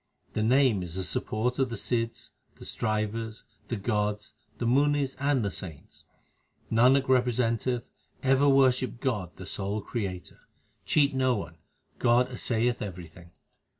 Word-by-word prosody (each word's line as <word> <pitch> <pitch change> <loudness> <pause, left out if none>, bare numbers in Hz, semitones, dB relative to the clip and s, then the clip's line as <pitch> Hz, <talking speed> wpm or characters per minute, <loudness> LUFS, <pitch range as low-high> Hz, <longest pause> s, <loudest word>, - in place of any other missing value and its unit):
The 110 - -1
Name 125 -2 +4
is 85 -1 -6
the 95 - -2
support 120 +7 -1
of 135 -2 +2
the 115 - -4
sidhs, 115 +2 -2 0.2
the - - -11
strivers, 110 +1 -2 0.2
the 120 - -2
gods, 105 0 -2 0.2
the 120 - -2
munis, 140 +2 +2
and 140 -5 +1
the 100 - -1
saints. 80 -5 -9 0.7
Nanak 130 +4 +4
representeth, 125 -1 +1 0.4
ever 135 +2 +4
worship 130 -2 +3
God 115 - -1
the 95 - -9
sole 100 +3 -3
Creator. 95 -5 -5 0.5
Cheat 145 -2 +3
no 130 -1 +2
one; 85 -6 -6 0.4
God 125 +1 +3
assayeth 120 -1 0
everything. 85 -3 -8
115 Hz, 135 wpm, -28 LUFS, 105-130 Hz, 0.7 s, Name